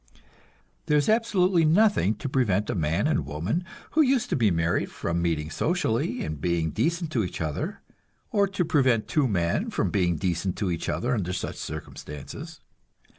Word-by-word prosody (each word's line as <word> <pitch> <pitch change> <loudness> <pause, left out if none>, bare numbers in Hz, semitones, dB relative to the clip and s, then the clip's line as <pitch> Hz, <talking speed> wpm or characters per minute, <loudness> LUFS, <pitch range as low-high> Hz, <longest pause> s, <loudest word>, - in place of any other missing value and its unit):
There 150 -2 +4
is 145 - +2
absolutely 195 -6 +3
nothing 165 - +4
to 105 - -5
prevent 110 -7 +1
a - - -1
man 80 -3 0
and - - +1
woman 80 - -2 0.3
who 315 - +4
used 270 -4 +2
to - - +3
be 115 -5 +3
married 85 -1 0
from 85 0 -2
meeting 80 -2 -1
socially 140 - 0
and 75 -2 -5
being 85 -2 0
decent 165 - -1
to 120 -7 +1
each 90 - -5
other, 80 -2 -3 0.5
or 200 -2 +3
to 195 -2 -1
prevent 130 -8 +2
two 150 -4 +2
men 85 -6 0
from - - -1
being 90 -3 +2
decent 90 +1 -1
to 100 -4 -1
each 85 - -3
other 125 +2 0
under 90 -6 -1
such - - -4
circumstances. 80 - -8
110 Hz, 175 wpm, -26 LUFS, -, 0.5 s, There